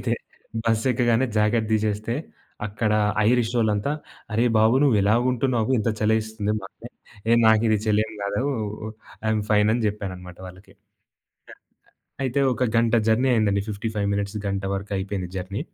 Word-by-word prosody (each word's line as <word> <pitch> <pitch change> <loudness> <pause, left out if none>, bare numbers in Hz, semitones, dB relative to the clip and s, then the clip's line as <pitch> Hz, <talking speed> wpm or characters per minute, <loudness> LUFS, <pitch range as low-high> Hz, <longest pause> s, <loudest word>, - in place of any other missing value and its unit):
అయితే - - -1 0.5
బస్సు 115 +1 +1
ఎక్కగానే 120 +1 +2
జాకెట్ 110 +1 +2
దీసేస్తే, 110 +1 0 0.5
అక్కడ 105 +1 -1 0.4
ఐరిషొళ్ళంతా 115 0 +1 0.4
"అరే 115 +3 +2
బాబు 110 +2 +4
నువ్వెలాగ 110 -4 +3
ఉంటున్నావు 125 -2 0
ఇంత 110 - 0
చలేస్తుంది 110 -1 0
మాకు?" 95 - -11 0.4
ఏ - - +5
నాకిది 110 0 +4
చలేం 110 +1 +1
గాదు 100 +4 -1 0.8
ఐ‌యమ్ 110 0 +1
ఫైన్ 105 -1 +4
అని 120 - 0
జెప్పాననమాట 95 -4 -5
వాళ్ళకి. 95 +2 -14 1.3
అ - - -19
అయితే 130 +2 0
ఒక 125 - 0
గంట 115 0 +3
జర్నీ 120 +4 +3
అయిందండి. 105 -4 +2
55 105 0 -3
మినిట్స్ 100 +1 -2
గంట 100 0 -2
వరకు 100 +1 -5
అయిపోయింది 95 -1 -3
జర్నీ. 95 +3 -4
110 Hz, 135 wpm, -24 LUFS, 100-115 Hz, 1.3 s, ఏ